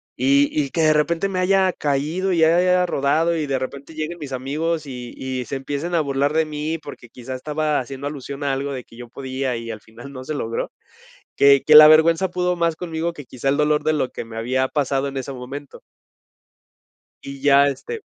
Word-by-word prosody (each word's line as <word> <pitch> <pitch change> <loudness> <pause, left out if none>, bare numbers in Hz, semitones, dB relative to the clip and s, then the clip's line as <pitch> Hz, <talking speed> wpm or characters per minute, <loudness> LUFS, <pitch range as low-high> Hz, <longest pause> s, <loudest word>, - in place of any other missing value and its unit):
y 140 +2 +3
y 145 -3 -1
que 165 - 0
de 155 -1 +5
repente 170 +5 +1
me 185 - -3
haya 190 0 +3
caído 155 +7 -1
y 165 -2 +3
haya 180 +2 +4
rodado 160 +4 +1
y 155 - -1
de 135 -2 -1
repente 140 +3 -7
lleguen 155 +2 -4
mis 145 -4 -8
amigos 150 +4 -2
y 125 -2 -7
y 130 -2 -4
se 135 - -4
empiecen 145 +6 -4
a 165 - +3
burlar 140 0 0
de 160 0 +2
mí, 155 +2 -4
porque 145 -4 -11
quizá 125 +2 -8
estaba 150 +2 -1
haciendo 135 +2 -6
alusión 140 0 -6
a 140 - 0
algo 140 +1 -2
de 130 - -6
que 115 - -18
yo 120 -1 -10
podía 130 0 -3
y 115 0 -7
al 110 -2 -6
final 120 +5 -12
no 130 -2 -8
se 155 - -4
logró, 115 -5 -3 0.7
que 140 -1 +6
que 155 0 +7
la 155 - +12
vergüenza 160 +4 +5
pudo 180 0 -1
más 170 -1 +1
conmigo 165 0 -3
que 145 -4 -10
quizá 130 +2 -2
el 140 - +1
dolor 150 0 +1
de 155 - +2
lo 135 -4 0
que - - -6
me 115 0 -11
había 130 +3 0
pasado 140 -1 -1
en 135 0 -5
ese 135 +1 -4
momento. 135 +3 -9 1.4
Y 140 0 -8
ya, 140 0 +5
este 410 - -5
145 Hz, 215 wpm, -21 LUFS, 135-160 Hz, 1.4 s, la